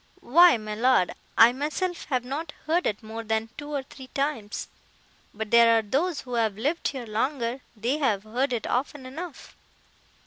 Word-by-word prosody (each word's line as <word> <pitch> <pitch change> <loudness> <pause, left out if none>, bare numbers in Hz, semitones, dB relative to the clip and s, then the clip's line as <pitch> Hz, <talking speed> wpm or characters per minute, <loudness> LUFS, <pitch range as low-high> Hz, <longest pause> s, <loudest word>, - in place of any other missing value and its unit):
"Why, 340 +2 +7
my 215 -1 -6
Lord, 235 -4 +3 0.2
I 230 +1 +8
myself 320 +6 -2
have 255 -4 -1
not 295 +4 -4
heard 335 +3 +1
it 210 +1 -3
more 225 +1 -6
than 220 0 -1
two 290 0 -8
or 280 -2 -2
three 265 0 -12
times, 275 -7 -3 0.6
but 215 0 -6
there 230 -1 +7
are 225 - +1
those 290 - 0
who 250 - -9
have 220 -4 +1
lived 295 +9 0
here 260 -4 -4
longer, 235 +3 -2 0.2
that 245 +8 -1
have 215 -9 +1
heard 250 +5 -1
it 235 -3 -2
often 265 +2 -2
enough." 310 +4 -8
255 Hz, 175 wpm, -26 LUFS, 225-290 Hz, 0.6 s, I